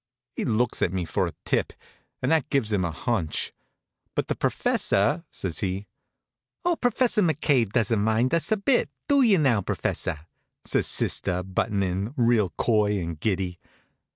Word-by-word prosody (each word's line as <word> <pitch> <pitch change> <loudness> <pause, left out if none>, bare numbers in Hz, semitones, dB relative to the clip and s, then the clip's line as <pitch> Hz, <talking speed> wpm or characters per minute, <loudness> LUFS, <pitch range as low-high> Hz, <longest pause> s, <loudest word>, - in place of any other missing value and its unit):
He - - -2
looks 120 +1 0
at 85 - +2
me 95 -2 -2
for 80 - 0
a - - -7
tip, - - 0 0.5
and 130 - +1
that 155 -3 +2
gives 120 -7 0
him 95 -3 +1
a 85 - 0
hunch. 85 0 -2 0.6
"But - - -1
the - - 0
professor 105 - +1
" - - -53
says 85 -5 -3
he. 95 +1 -2 0.8
"Oh, 350 -1 +3
Professor 245 -4 +2
McCabe 145 - +2
doesn't 115 -1 +2
mind 110 +5 +1
us 170 +4 +2
a 220 - +3
bit; 240 +5 +2 0.2
do 280 -1 +4
you 220 -7 +5
now, 130 -9 +3
professor?" 90 -3 -2 0.4
says - - +1
sister, 90 0 +1
buttin' 100 +2 -1
in, 95 +7 -2
real 115 -5 +3
coy 105 -3 +2
and 85 -3 -5
giddy. 95 -2 -1
110 Hz, 165 wpm, -25 LUFS, 95-145 Hz, 0.8 s, you